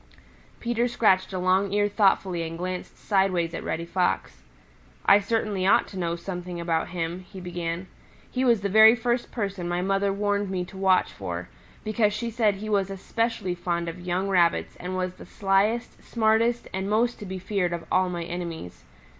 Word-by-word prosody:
Peter 240 0 0
scratched 195 -6 +2
a 190 - -3
long 185 +2 +2
ear 205 0 +2
thoughtfully 195 -4 +2
and 165 0 -4
glanced 180 +1 -5
sideways 185 -4 +1
at - - -5
Reddy 170 +1 -3
Fox. 175 - -1 0.6
"I 200 - +7
certainly 205 -2 -1
ought - - +4
to 190 - -7
know 170 -1 -1
something 175 0 -6
about 165 -1 0
him," 170 0 -3
he 185 +1 -11
began. 175 0 -4 0.5
"He 255 - 0
was 235 -5 +4
the 200 - 0
very 220 +3 +8
first 240 +1 -1
person 195 -6 -3
my 175 +1 -1
mother 195 +1 +1
warned 205 0 0
me 185 -2 -2
to 185 - -14
watch 190 -1 +3
for, - - -5 0.3
because 215 -1 +1
she 230 +2 -3
said 215 -3 +2
he 210 +2 -7
was 200 -2 +1
especially 200 0 -2
fond 170 -1 -2
of 165 +2 -5
young 180 +2 -1
Rabbits 175 -3 +2
and 180 +1 -5
was 185 0 -2
the - - -12
slyest, 205 +4 0
smartest 230 +1 +1
and 190 +1 -2
most 235 +3 +1
to 210 - -7
be 190 0 -4
feared 185 -1 -1
of 170 -1 -4
all 185 0 +3
my 175 -1 -3
enemies. 170 - -6
190 Hz, 185 wpm, -26 LUFS, 175-210 Hz, 0.6 s, very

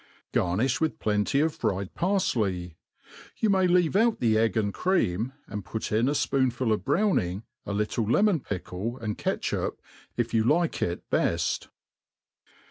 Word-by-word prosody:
Gacnifh 110 - +1
with 160 -1 0
plenty 105 +6 +1
of 160 0 +1
fryed 95 -6 -2
parflcy; 105 - 0 0.6
you 220 - +2
may 190 -1 +3
leave 175 -1 +3
out 225 +2 +3
the 115 -3 +2
egg 110 -1 +2
and 100 -2 0
cream, 120 - 0
and 105 -1 -6
put 105 +5 -5
in 115 +5 +2
a - - +1
fpoonful 130 -5 +1
of 105 - -2
browning, 110 - +1 0.2
a - - -2
little 105 +2 0
lemon. 200 - +3
pickle 100 - -5
and 110 -4 -3
catch^ - - -1
up - - -3 0.4
if 120 -1 -1
you 110 -1 +3
like 165 +7 +1
it 85 - -2
beft. 85 +1 0
115 Hz, 155 wpm, -27 LUFS, 100-160 Hz, 0.6 s, may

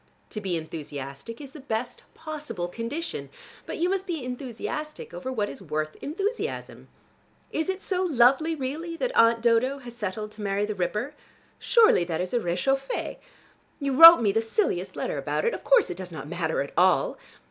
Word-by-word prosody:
To 215 - -5
be 185 -4 -1
enthusiastic 145 +3 -7
is 280 -2 -9
the 300 - -11
best 240 -3 -4
possible 295 - -5
condition, 235 - -5 0.4
but - - -4
you 345 - +1
must 385 +1 -1
be 325 -8 -3
enthusiastic 255 +4 -5
over 180 +9 -5
what 215 -5 -1
is - - -9
worth 155 -2 -3
enthusiasm. 390 +10 -4 0.6
Is 320 +4 -1
it 380 +1 -3
so 370 -2 -1
lovely 305 0 +3
really, 315 +5 -4
that - - -2
Aunt 230 0 +5
Dodo 240 +4 +3
has 245 -3 -10
settled 210 -1 -4
to 215 - -11
marry 200 0 0
the 215 - -3
Ripper? 210 +7 -2 0.5
Surely 445 - +5
that 165 -2 -3
is 180 0 -3
a 240 - +3
rechauffée. 270 +9 -1 0.6
You 280 -2 -1
wrote 330 +2 +11
me 210 -3 +3
the 225 - +1
silliest 225 - -1
letter - - -2
about - - -1
it. 470 - +2
Of - - -6
course - - +4
it 175 - -6
does 185 -1 -7
not 155 -3 -7
matter 160 -3 -1
at 140 - -10
all. 190 - +3
240 Hz, 180 wpm, -26 LUFS, 185-310 Hz, 0.6 s, wrote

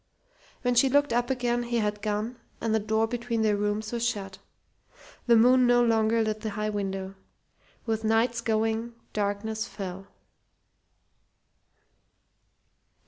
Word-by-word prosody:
When 245 0 +2
she 245 +3 +4
looked 285 -2 +3
up 240 0 +1
again 245 -2 0
he 240 0 -2
had 210 -2 -1
gone 215 +3 -2 0.2
and 225 - -1
the 220 - +3
door 220 +1 +1
between 235 -1 -2
their 210 -1 +3
rooms 210 +1 -2
was 235 -1 -2
shut. 195 -5 -3 0.9
The 235 - +6
moon 250 +2 +5
no 245 0 +5
longer 225 -1 +2
lit 215 0 -2
the 220 - -4
high 215 +1 -2
window. 195 -2 -3 0.7
With 220 -1 -1
Knight's 230 +2 +2
going 225 +1 -1 0.2
darkness 215 +2 -2
fell. 195 -1 -7
220 Hz, 135 wpm, -27 LUFS, 210-240 Hz, 0.9 s, The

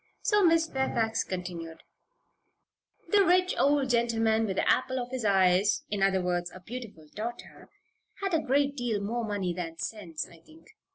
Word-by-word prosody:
So 415 -1 +3
Miss 330 -2 +4
Fairfax 235 -5 0
continued: 175 -3 -6 1.3
"This 415 -1 +5
rich 365 0 +3
old 280 -2 +2
gentleman 225 -2 +2
with 190 - -2
the - - 0
apple 260 0 +2
in 245 -1 -2
his 260 -2 -3
eye 190 -2 +4 0.3
in 205 -2 -1
other 190 -1 +2
words, 175 -1 -1
a 185 - -11
beautiful 205 -6 -9
daughter 235 +3 -7 0.5
had 390 -2 -2
a 325 - +4
great 280 +1 +1
deal 240 -5 -1
more 230 +4 -2
money 200 -5 -2
than 165 -2 -5
sense, 170 -4 -5
I 170 -2 -17
think. 320 - -19
225 Hz, 165 wpm, -28 LUFS, 185-265 Hz, 1.3 s, This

